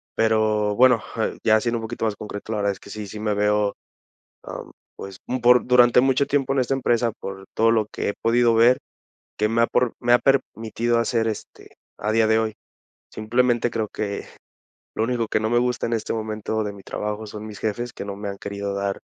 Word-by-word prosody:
Pero, 110 -2 +2
bueno, 125 -1 +5 0.4
ya 110 0 +4
siendo 120 0 0
un 115 - -6
poquito 115 0 -3
más 110 -2 -1
concreto, 105 +1 -7
la 110 - -1
verdad 100 -1 +1
es 95 - -8
que - - -14
sí, 105 0 -6
sí 105 +2 -8
me 105 -1 -1
veo, 105 0 +1 0.7
am, - - -8 0.2
pues, 95 -1 -9
un 130 0 -2
por 125 +1 +5
durante 125 -1 +5
mucho 135 +1 +2
tiempo 135 -1 +1
en 135 - +1
esta 130 +1 +1
empresa, 120 -3 +1
por 95 0 -7
todo 115 +1 +4
lo 110 -2 +2
que - - -2
he - - -2
podido 120 0 +3
ver, 120 +3 +5 0.6
que 105 0 +2
me 115 +1 +2
ha - - +2
pro 125 -2 +1
me 120 0 +3
ha 120 - +6
permitido 115 -3 0
hacer, 115 -1 0
este, 110 -2 -7 0.2
a 105 - -2
día 110 0 +3
de 110 0 +4
hoy. 110 -1 0 0.6
Simplemente 120 +2 +1
creo 110 -1 -2
que 100 -1 -4 0.7
lo 110 - 0
único 115 -1 -1
que 105 - 0
no 110 - 0
me 120 +1 +3
gusta 125 -1 0
en - - -4
este 110 -1 -2
momento 110 0 -3
de 105 - -3
mi 100 -1 -13
trabajo 105 +1 -4
son 105 +1 -8
mis 105 -2 -9
jefes, 120 +3 -3
que - - -7
no 100 -1 -5
me 100 0 -5
han 100 - -6
querido 100 0 -4
dar 100 0 -2
110 Hz, 220 wpm, -23 LUFS, 105-120 Hz, 0.7 s, ha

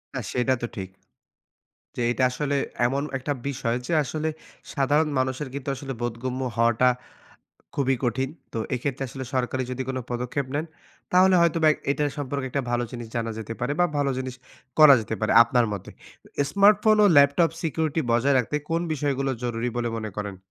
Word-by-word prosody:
না, 130 - -1
সেটা 125 +1 +2
তো - - 0
ঠিক। 95 -2 -5 1.1
যে - - -3
এইটা 130 +2 0
আসলে 145 +2 -2 0.3
এমন 135 +2 -1 0.2
একটা 140 +3 -2
বিষয় 120 -3 -1
যে - - -1
আসলে 155 +3 -3 0.5
সাধারণ 150 +2 +2
মানুষের 130 +2 -1
কিন্তু 140 0 -5
আসলে 135 0 -6
বোধগম্য 125 +2 -3 0.2
হওয়াটা 115 +2 +4 0.9
খুবই 135 -2 +1
কঠিন। 130 +3 0 0.2
তো 115 - -3 0.2
এইক্ষেত্রে 135 +2 -3
আসলে 130 +1 -6
সরকারি 130 0 0
যদি 130 +1 -3
কোনো 130 -1 -2
পদক্ষেপ 125 +3 -2
নেন, 150 +2 0 0.5
তাহলে 185 +1 +6
হয়তোবা 165 -2 +3 0.2
এটা 150 +1 +1
সম্পর্কে 140 -1 -3
একটা 140 +1 -1
ভালো 120 0 +1
জিনিস 120 -2 -6
জানা 115 -1 -1
যেতে 110 0 -5
পারে 125 +4 0
বা 175 - +6
ভালো 140 -1 +1
জিনিস 130 -1 -4 0.4
করা 150 -3 +10
যেতে 110 0 -4
পারে 110 - +1
আপনার 115 0 +2
মতে। 100 - -6 0.3
তো - - -18 0.2
স্মার্টফোন 210 +2 +5
ও - - +7
ল্যাপটপ 140 +4 +5
security 160 0 0
বজায় 135 +4 +3
রাখতে 130 +4 -1
কোন 165 - +1
বিষয়গুলো 140 -2 -1
জরুরি 120 0 -1
বলে 120 -1 0
মনে 110 -1 -5
করেন? 100 -2 -4
130 Hz, 175 wpm, -25 LUFS, 120-145 Hz, 1.1 s, করা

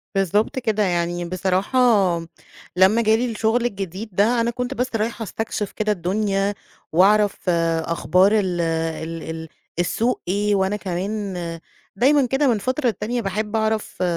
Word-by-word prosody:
بالضبط 200 +6 +1
كده، 220 -4 0
يعني 175 -1 -1
بصراحة 185 +6 -1 1.0
لما 190 +5 +5
جالي 230 +2 +2
الشُغل 225 +2 +1
الجديد 200 -1 -4
ده 220 +6 +2
أنا 235 +1 0
كنت 250 +2 -3
بس 255 -1 -2
رايحة 225 +1 -2
أستكشف 215 -1 -4
كده 215 0 -1
الدنيا، 195 +2 0 0.4
وأعرف 200 +2 +3 0.3
أخبار 180 +6 +2
ال 180 -3 -1
ال 165 0 -2
ال 160 0 -6 0.3
السوق 230 +8 0
إيه، 205 +3 +1
وأنا 190 +1 +1
كمان 200 +1 -3 0.6
دايمًا 270 +6 +4
كده 270 +3 +1
من 235 -4 +3
فترة 255 +7 -2
للتانية 235 +2 -1
باحب 210 +2 -3
أعرف 220 -3 -1
205 Hz, 135 wpm, -22 LUFS, 185-225 Hz, 1.0 s, لما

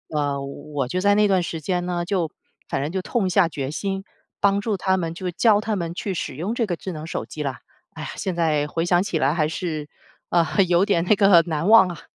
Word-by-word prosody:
呃， 145 -2 0
我 140 0 -5
就 185 +7 -2
在 205 +1 +4
那 210 0 +4
段 190 -2 +3
时 165 -1 -4
间 180 +3 -1
呢， 175 -1 -2
就 175 -4 -1 0.4
反 - - -1
正 145 +4 -2
就 190 0 -2
痛 200 -1 -1
下 185 -2 +3
决 140 -2 -4
心， 195 +3 -3 0.4
帮 200 0 +3
助 210 -2 -1
他 190 0 +1
们， 165 -2 -3
就 180 -1 -4
教 210 +3 +4
他 215 -1 -2
们 170 -2 -4
去 195 0 -3
使 140 - -4
用 185 +10 -3
这 230 -3 0
个 175 - -1
智 185 - -6
能 155 0 -7
手 - - -4
机 150 - -7
了。 135 -3 -2 0.4
哎 - - -7
呀， - - -5
现 185 -3 -3
在 155 -3 +1
回 165 +3 -2
想 175 0 +3
起 195 -5 -1
来 140 0 +2
还 155 -3 +1
是， 155 -3 -4 0.4
呃， 170 -1 +3 0.2
有 175 +2 +3
点 175 -5 +2
那 210 - +4
个 195 -4 +6
难 160 +3 -1
忘 220 -4 +8
啊。 170 -3 -7
175 Hz, 260 characters per minute, -23 LUFS, 155-195 Hz, 0.4 s, 忘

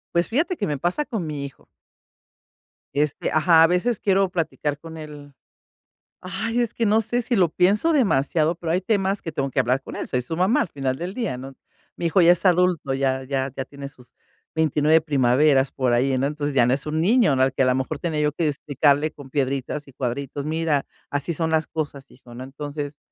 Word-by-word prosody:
Pues 170 - +2
fíjate 325 - 0
que 205 - -2
me 150 -2 -2
pasa 175 - -1
con 220 - -4
mi 145 -2 -4
hijo. 135 - -12 1.3
Este 145 0 0
ajá, 160 +1 +5
a - - +6
veces 180 +6 0
quiero 195 -1 +2
platicar 160 -4 -2
con 160 +2 -10
él 150 -2 -10 0.9
ay, 225 +6 -3
es 235 -2 -2
que 230 -2 0
no 215 +2 +4
sé, 240 +3 -1
si 240 - -1
lo 180 -5 +3
pienso 205 - +2
demasiado, 165 - +2
pero 165 -1 -4
hay 180 - +1
temas 195 -1 0
que 165 - -5
tengo 140 -3 -2
que - - 0
hablar 125 +3 +1
con - - -8
él. - - -4
Soy 125 -1 -1
su 160 - -5
mamá 185 +7 +2
al - - -1
final 135 -4 -2
del 175 +4 -5
día, 220 - -3
¿no? 135 +1 -9 0.4
Mi 170 - -1
hijo 180 +3 +3
ya 170 - +7
es 175 - +1
adulto, 175 -6 +2
ya 135 -1 0
ya 135 0 -2
ya 135 - -4
tiene 140 0 -9
sus 125 -3 -18 0.4
29 155 0 +3
primaveras 135 -2 +3
por 130 -2 0
ahí, 130 +2 +2
¿no? 130 - +1
Entonces, 145 0 -3
ya 120 -3 +5
no 125 - +2
es 140 +3 -3
un 155 +1 -1
niño, 210 - +4
¿no?, 130 - +3
al 130 0 +1
que - - -1
a 130 - +4
la 125 - +3
mejor 130 +3 -3
tenía 160 -2 -2
yo 150 0 +2
que 160 +2 -1
explicarle 145 +1 +1
con 140 -2 -13
piedritas 140 +1 -2
y 140 - -15
cuadritos: 135 +3 -4
"Mira, 155 -1 0 0.3
así 145 +4 -2
son 160 +1 -1
las 160 -1 +1
cosas, 145 -4 -5
hijo", 125 -2 -16
¿no? 125 - -7
Entonces, 145 +1 -6
150 Hz, 220 wpm, -23 LUFS, 135-175 Hz, 1.3 s, ya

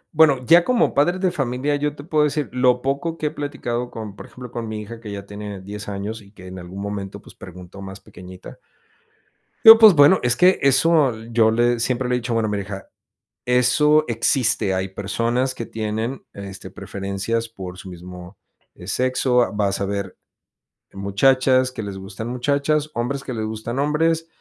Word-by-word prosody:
Bueno, 145 -5 +4
ya 170 +4 +6
como 240 +3 +2
padres 175 +6 +2
de 185 - +2
familia, 135 +1 -1
yo 145 0 -2
te 145 - -10
puedo 150 -1 +2
decir, 150 -1 -1
lo 125 -1 +2
poco 140 +5 -2
que 155 - -4
he - - -3
platicado 125 -5 -4
con, 110 -4 -8
por - - -11
ejemplo, 125 -2 -11
con 115 -1 -5
mi 110 0 -5
hija 115 +2 -9
que 105 -3 -8
ya 100 -1 -7
tiene 100 -1 -7
10 100 +2 -8
años 105 +3 -5
y 100 - -17
que 95 -3 -14
en 95 0 -8
algún 90 +2 -9
momento, 100 -1 -5
pues, - - -16
preguntó 90 +1 -12
más 95 0 -9
pequeñita 90 0 -13 1.1
digo, 225 0 +12
pues, 220 -3 +8
bueno, 145 +4 +6
es 120 -1 +2
que 180 +1 +4
eso 140 -1 +3 0.2
yo 115 -1 +4
le 120 +1 +2
siempre 125 +1 -1
le 125 - +2
he - - +1
dicho, 120 0 -3
bueno, 115 -2 0
mira 100 -1 -2
hija: 95 0 -8 0.6
"Eso 150 +5 +3
existe. 115 -4 +1
Hay 95 +1 -2
personas 115 +6 -1
que 115 - -5
tienen, 110 +4 -4
este, 100 -1 -9
preferencias 100 +4 -4
por 95 -4 -9
su 95 - -10
mismo 90 +1 -11 0.5
sexo. 125 +4 +1
Ah, - - -1
vas 100 -1 -1
a 100 - -1
ver 100 -2 -4 0.8
muchachas 130 +6 +2
que 125 -3 -7
les 100 -2 -6
gustan 95 +4 -7
muchachas, 140 +4 0
hombres 135 +4 -2
que 130 - -5
les 110 - -3
gustan 110 +3 -5
hombres, 160 +3 +1
120 Hz, 185 wpm, -21 LUFS, 100-140 Hz, 1.1 s, digo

